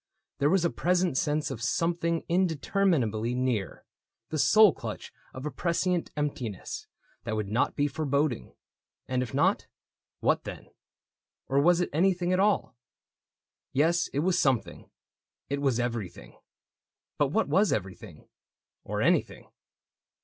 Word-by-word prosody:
There 145 Hz, -, +3 dB
was 180 Hz, 0 st, +2 dB
a 170 Hz, -, +1 dB
present 180 Hz, -3 st, +1 dB
sense 150 Hz, 0 st, 0 dB
Of 120 Hz, -3 st, -6 dB
something 170 Hz, +6 st, 0 dB
indeterminably 160 Hz, -, +1 dB
near 125 Hz, -6 st, -2 dB, 0.2 s
— 115 Hz, -, -62 dB
The 155 Hz, -, -1 dB
soul 175 Hz, +8 st, +6 dB
clutch -, -, -7 dB, 0.2 s
of 130 Hz, +2 st, -8 dB
a 150 Hz, -, -2 dB
prescient 170 Hz, +4 st, 0 dB
emptiness 125 Hz, -9 st, -4 dB, 0.4 s
That 110 Hz, 0 st, -3 dB
would 105 Hz, -2 st, -3 dB
not 110 Hz, +4 st, +1 dB
be 145 Hz, -, +1 dB
foreboding. 145 Hz, -2 st, -1 dB, 0.5 s
And 130 Hz, 0 st, 0 dB
if 125 Hz, -4 st, -4 dB
not, -, -, +2 dB, 0.5 s
What -, -, +1 dB
then? -, -, -9 dB, 0.4 s
— -, -, -65 dB
or 135 Hz, +1 st, +3 dB
was 175 Hz, +3 st, +4 dB
it -, -, -1 dB
anything 180 Hz, +2 st, +2 dB
at 185 Hz, -, +2 dB
all? 200 Hz, -, +1 dB, 1.0 s
Yes, 165 Hz, +5 st, +2 dB
it 140 Hz, -, -2 dB
was 180 Hz, +2 st, +2 dB
something 130 Hz, -6 st, 0 dB, 0.3 s
— -, -, -59 dB
it 140 Hz, 0 st, -1 dB
was 135 Hz, -4 st, +1 dB
everything 115 Hz, -7 st, -5 dB, 0.4 s
— -, -, -65 dB
But 145 Hz, -, +4 dB
what 220 Hz, +11 st, 0 dB
was 200 Hz, +1 st, +3 dB
everything? 95 Hz, -3 st, -5 dB, 0.6 s
or -, -, -2 dB
anything -, -, 0 dB
145 Hz, 145 wpm, -28 LUFS, 125-175 Hz, 1.0 s, soul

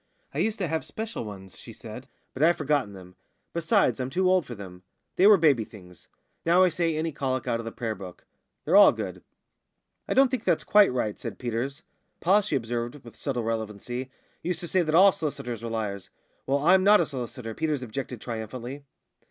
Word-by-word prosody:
"I -, -, -3 dB
used 220 Hz, 0 st, 0 dB
to 185 Hz, -, -1 dB
have 160 Hz, 0 st, -2 dB
special 225 Hz, -, -5 dB
ones," 95 Hz, -5 st, -10 dB
she -, -, -11 dB
said, -, -, -10 dB, 0.3 s
"but 130 Hz, -, -6 dB
I've 170 Hz, +2 st, +5 dB
forgotten 145 Hz, -8 st, 0 dB
them. 90 Hz, -1 st, -13 dB, 0.4 s
Besides, 170 Hz, -, +2 dB
I'm 130 Hz, 0 st, -2 dB
too 185 Hz, +6 st, +1 dB
old 185 Hz, -2 st, +3 dB
for 120 Hz, -, -6 dB
them; 90 Hz, -3 st, -10 dB, 0.3 s
they 190 Hz, -, +5 dB
were 210 Hz, -1 st, +8 dB
baby 145 Hz, -9 st, +3 dB
things. 90 Hz, -5 st, -15 dB, 0.4 s
Now 175 Hz, +3 st, +5 dB
I 185 Hz, -, +5 dB
say 165 Hz, -2 st, 0 dB
any 160 Hz, +1 st, -1 dB
colic 130 Hz, -3 st, -2 dB
out 115 Hz, -, 0 dB
of 115 Hz, -, -6 dB
the 115 Hz, -, -4 dB
prayer 115 Hz, -1 st, -3 dB
book. 95 Hz, -3 st, -11 dB, 0.4 s
They're -, -, +2 dB
all -, -, +9 dB
good." -, -, -6 dB, 0.8 s
"I -, -, -1 dB
don't 270 Hz, 0 st, +5 dB
think 255 Hz, -4 st, -2 dB
that's -, -, +1 dB
quite 205 Hz, -5 st, +5 dB
right," 110 Hz, -5 st, -2 dB
said -, -, -6 dB
Peters. 125 Hz, +5 st, -3 dB, 0.4 s
"Pa," 195 Hz, +5 st, +4 dB
she 200 Hz, -7 st, -2 dB
observed, 120 Hz, +2 st, -3 dB
with 115 Hz, -2 st, -13 dB
subtle 125 Hz, 0 st, -3 dB
relevancy, 115 Hz, +3 st, -4 dB, 0.3 s
"used 175 Hz, +1 st, -3 dB
to 175 Hz, -, -5 dB
say 185 Hz, +2 st, +2 dB
that 155 Hz, -2 st, 0 dB
all 195 Hz, +3 st, +8 dB
s'listers 125 Hz, -, -4 dB
were 115 Hz, -, -5 dB
liars." 105 Hz, -4 st, -4 dB, 0.4 s
"Well, 135 Hz, +1 st, +2 dB
I'm 180 Hz, +6 st, +4 dB
not 210 Hz, +2 st, +7 dB
a 170 Hz, -, +2 dB
solicitor," 125 Hz, -4 st, -6 dB
Peters 150 Hz, -1 st, -1 dB
objected 125 Hz, +1 st, -5 dB
triumphantly. 120 Hz, +4 st, -6 dB
130 Hz, 200 wpm, -27 LUFS, 115-170 Hz, 0.8 s, all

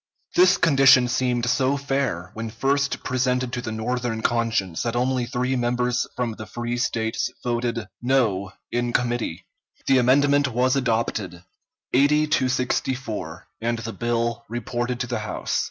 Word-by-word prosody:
This 365 Hz, +1 st, +6 dB
condition 135 Hz, -5 st, +6 dB
seemed 125 Hz, -1 st, 0 dB
so 130 Hz, +2 st, +2 dB
fair, 135 Hz, -11 st, -2 dB
when 115 Hz, +1 st, -5 dB
first 140 Hz, +5 st, 0 dB
presented 125 Hz, -1 st, 0 dB
to 125 Hz, -, -2 dB
the 110 Hz, -, -5 dB
Northern 115 Hz, 0 st, -2 dB
conscience, 115 Hz, -7 st, 0 dB
that 115 Hz, 0 st, -2 dB
only 125 Hz, 0 st, 0 dB
three 125 Hz, +2 st, -1 dB
members 125 Hz, 0 st, 0 dB
from 125 Hz, -2 st, -1 dB
the 110 Hz, 0 st, -8 dB
free 120 Hz, 0 st, -3 dB
States 115 Hz, -2 st, -1 dB
voted 120 Hz, -2 st, -1 dB, 0.2 s
"no" 115 Hz, -7 st, +1 dB, 0.2 s
in 120 Hz, 0 st, -1 dB
committee. 120 Hz, -8 st, -1 dB, 0.4 s
The 135 Hz, -1 st, +4 dB
amendment 140 Hz, +3 st, +4 dB
was 130 Hz, +2 st, +1 dB
adopted 110 Hz, -8 st, -1 dB, 0.5 s
eighty 145 Hz, +3 st, +4 dB
to 140 Hz, -4 st, +1 dB
sixty 130 Hz, +1 st, 0 dB
four 105 Hz, -10 st, -6 dB, 0.2 s
and 120 Hz, +1 st, 0 dB
the 115 Hz, 0 st, -5 dB
bill 120 Hz, 0 st, -1 dB
reported 120 Hz, +1 st, -3 dB
to -, -, 0 dB
the 120 Hz, -2 st, -2 dB
House. 105 Hz, -3 st, -2 dB
120 Hz, 150 wpm, -24 LUFS, 115-130 Hz, 0.5 s, This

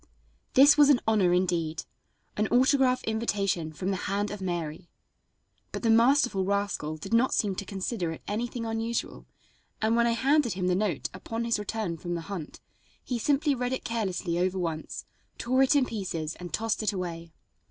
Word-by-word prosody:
This 285 Hz, +3 st, +7 dB
was 290 Hz, -1 st, +7 dB
an 275 Hz, -4 st, +5 dB
honor 205 Hz, -5 st, +3 dB
indeed 170 Hz, -3 st, 0 dB, 0.5 s
an 210 Hz, +1 st, +1 dB
autograph 255 Hz, +1 st, +3 dB
invitation 200 Hz, -7 st, -1 dB
from 185 Hz, +5 st, -3 dB
the 190 Hz, -, -1 dB
hand 205 Hz, +1 st, -1 dB
of 210 Hz, -1 st, -6 dB
Mary! 170 Hz, -2 st, -4 dB, 0.8 s
But -, -, -5 dB
the 225 Hz, -, +4 dB
masterful 240 Hz, -3 st, +4 dB
rascal 200 Hz, -6 st, -1 dB
did 155 Hz, -, -7 dB
not 235 Hz, +3 st, +3 dB
seem 205 Hz, -4 st, +1 dB
to 200 Hz, -, -4 dB
consider 190 Hz, -2 st, -3 dB
it 160 Hz, -, -9 dB
anything 230 Hz, +2 st, -3 dB
unusual, 225 Hz, +1 st, -3 dB, 0.5 s
and 220 Hz, +1 st, +2 dB
when 235 Hz, 0 st, +3 dB
I 235 Hz, -, +2 dB
handed 270 Hz, +1 st, +2 dB
him 185 Hz, -1 st, -3 dB
the 180 Hz, -, +2 dB
note 190 Hz, -4 st, -1 dB
upon 225 Hz, +5 st, -4 dB
his 230 Hz, -2 st, 0 dB
return 210 Hz, -4 st, -3 dB
from 175 Hz, +2 st, -4 dB
the 170 Hz, -, -3 dB
hunt, 170 Hz, -3 st, -7 dB, 0.4 s
he 245 Hz, -2 st, -3 dB
simply 285 Hz, +4 st, +2 dB
read 250 Hz, -1 st, -2 dB
it 260 Hz, -, -3 dB
carelessly 190 Hz, -6 st, -2 dB
over 185 Hz, +1 st, 0 dB
once, 165 Hz, -3 st, -4 dB, 0.3 s
tore 255 Hz, +2 st, +1 dB
it 270 Hz, +2 st, +4 dB
in 275 Hz, -3 st, +4 dB
pieces 175 Hz, -9 st, -4 dB
and 175 Hz, -1 st, -7 dB
tossed 220 Hz, +7 st, -1 dB
it 215 Hz, -, +1 dB
away. 170 Hz, -3 st, -5 dB
205 Hz, 180 wpm, -28 LUFS, 180-235 Hz, 0.8 s, This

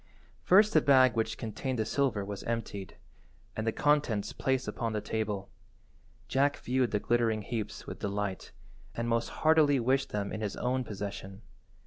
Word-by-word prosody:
First 205 Hz, -, +5 dB
the 155 Hz, -, +6 dB
bag 130 Hz, -4 st, +5 dB
which 115 Hz, -1 st, -1 dB
contained 125 Hz, +4 st, -3 dB
the 110 Hz, -, 0 dB
silver 120 Hz, -8 st, 0 dB
was 100 Hz, -1 st, -6 dB
emptied, 115 Hz, -4 st, -4 dB, 0.6 s
and 110 Hz, +1 st, -3 dB
the -, -, +3 dB
contents 145 Hz, -7 st, +1 dB
placed 130 Hz, -1 st, -1 dB
upon 115 Hz, -2 st, -2 dB
the 105 Hz, -, 0 dB
table. 105 Hz, -2 st, -3 dB, 0.8 s
Jack 140 Hz, +4 st, +2 dB
viewed 125 Hz, -1 st, 0 dB
the 105 Hz, -, 0 dB
glittering 115 Hz, -1 st, +1 dB
heaps 110 Hz, -1 st, -4 dB
with -, -, -7 dB
delight, 100 Hz, -1 st, -3 dB, 0.4 s
and 115 Hz, 0 st, -2 dB
most 115 Hz, 0 st, 0 dB
heartily 155 Hz, -3 st, +4 dB
wished 130 Hz, +3 st, +1 dB
them 100 Hz, -1 st, -3 dB
in 110 Hz, -, -4 dB
his 105 Hz, -2 st, -3 dB
own 130 Hz, +1 st, -1 dB
possession. 100 Hz, -2 st, -7 dB
115 Hz, 160 wpm, -30 LUFS, 105-130 Hz, 0.8 s, the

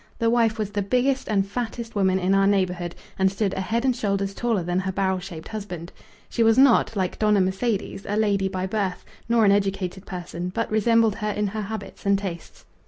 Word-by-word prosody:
The 230 Hz, 0 st, +2 dB
wife 230 Hz, -2 st, +2 dB
was 210 Hz, -2 st, -2 dB
the 205 Hz, 0 st, -1 dB
biggest 255 Hz, +6 st, +1 dB
and 200 Hz, -2 st, +2 dB
fattest 230 Hz, +2 st, -5 dB
woman 190 Hz, -2 st, +2 dB
in 190 Hz, +1 st, +1 dB
our 195 Hz, 0 st, +4 dB
neighbourhood 180 Hz, -3 st, 0 dB, 0.2 s
and 190 Hz, 0 st, +3 dB
stood 195 Hz, 0 st, -1 dB
a 190 Hz, -, -2 dB
head 230 Hz, +6 st, -1 dB
and 255 Hz, -2 st, +2 dB
shoulders 200 Hz, -3 st, -1 dB
taller 225 Hz, -4 st, 0 dB
than 175 Hz, +2 st, 0 dB
her 190 Hz, 0 st, -2 dB
barrel 190 Hz, -1 st, 0 dB
shaped 175 Hz, -4 st, -9 dB
husband. 180 Hz, -5 st, -6 dB, 0.4 s
She -, -, -2 dB
was 225 Hz, 0 st, +5 dB
not, 260 Hz, -4 st, +5 dB
like 185 Hz, -2 st, -2 dB
Dona 210 Hz, -1 st, +3 dB
Mercedes, 195 Hz, +2 st, -1 dB
a 205 Hz, -, 0 dB
lady 200 Hz, -3 st, +2 dB
by 185 Hz, -1 st, -3 dB
birth, 190 Hz, -2 st, -2 dB, 0.2 s
nor 230 Hz, -2 st, +4 dB
an 200 Hz, -, +6 dB
educated 195 Hz, -2 st, -1 dB
person, 175 Hz, -1 st, -5 dB
but 230 Hz, -1 st, -1 dB
resembled 225 Hz, 0 st, +3 dB
her 210 Hz, -, -2 dB
in 210 Hz, 0 st, -1 dB
her 215 Hz, +2 st, -3 dB
habits 205 Hz, -1 st, -7 dB
and 200 Hz, 0 st, +3 dB
tastes. 185 Hz, -4 st, -7 dB
200 Hz, 210 wpm, -24 LUFS, 190-220 Hz, 0.4 s, an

